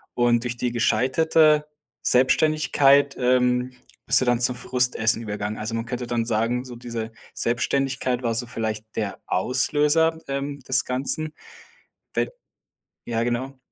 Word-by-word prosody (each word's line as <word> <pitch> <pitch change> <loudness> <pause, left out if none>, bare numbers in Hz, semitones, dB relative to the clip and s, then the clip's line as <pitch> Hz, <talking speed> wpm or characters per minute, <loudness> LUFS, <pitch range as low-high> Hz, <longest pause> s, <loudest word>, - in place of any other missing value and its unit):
und 120 -1 +2
durch 120 -1 -4
die 125 0 -2
gescheiterte 150 +5 +2 0.3
Selbstständigkeit, 140 +1 +3
ähm, 125 0 +1 0.3
bist 125 +1 +7
du - - +1
dann 120 -1 +2
zum 125 0 +4
Frustessen 125 -2 +1
übergegangen. 105 0 -4
Also, 110 +1 -4
man 115 0 -3
könnte 125 +1 -4
dann 120 -1 -2
sagen, 115 +2 -1
so 125 -2 -10
diese 115 -2 -6 0.2
Selbstständigkeit 130 +1 0
war 115 -2 -1
so 120 +2 +1
vielleicht 110 -2 -4
der 100 -3 -3
Auslöser 150 - +1
ähm, 140 +1 -4
des 130 -1 +1
Ganzen. 140 +5 -2 0.8
D - - 0 0.8
Ja 115 -1 -2
genau. 125 +3 -3
125 Hz, 135 wpm, -23 LUFS, 115-135 Hz, 0.8 s, bist